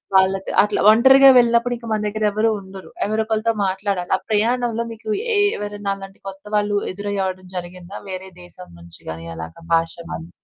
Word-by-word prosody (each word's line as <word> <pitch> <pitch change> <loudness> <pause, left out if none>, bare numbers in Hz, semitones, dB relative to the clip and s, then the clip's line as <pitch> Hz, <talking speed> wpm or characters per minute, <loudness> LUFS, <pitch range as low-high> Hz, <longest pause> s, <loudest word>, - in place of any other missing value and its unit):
వాళ్ళతో 190 0 +2
అట్లా 210 0 -1
ఒంటరిగా 265 +4 +7
వెళ్ళినప్పుడు 235 +1 +2
ఇంక 235 0 -11
మన 215 - 0
దగ్గర 215 +1 -2
ఎవరు 220 +2 +1
ఉండరు 190 0 -12 0.2
ఎవరో 220 +1 0
ఒకరితో 220 +1 0
మాట్లాడాలి. 190 -1 -2
ఆ - - -13
ప్రయాణంలో 235 +2 +1
మీకు 220 -1 -10 0.3
ఎ - - +3 0.2
ఎవరైనా 205 -1 -4
అలాంటి 195 0 -12
కొత్త 195 +1 -13
వాళ్ళు 205 0 +1 0.2
ఎదురయ్యడం 190 -2 -3
జరిగిందా? 180 +2 -8
వేరే 190 0 -6
దేశం 90 - -11
నుంచి 85 0 -11
గాని 80 +1 -8
అలాగా 80 - -9
భాష 165 0 0 0.2
వాళ్ళు? 165 +1 -6
205 Hz, 165 wpm, -21 LUFS, 185-220 Hz, 0.3 s, ఒంటరిగా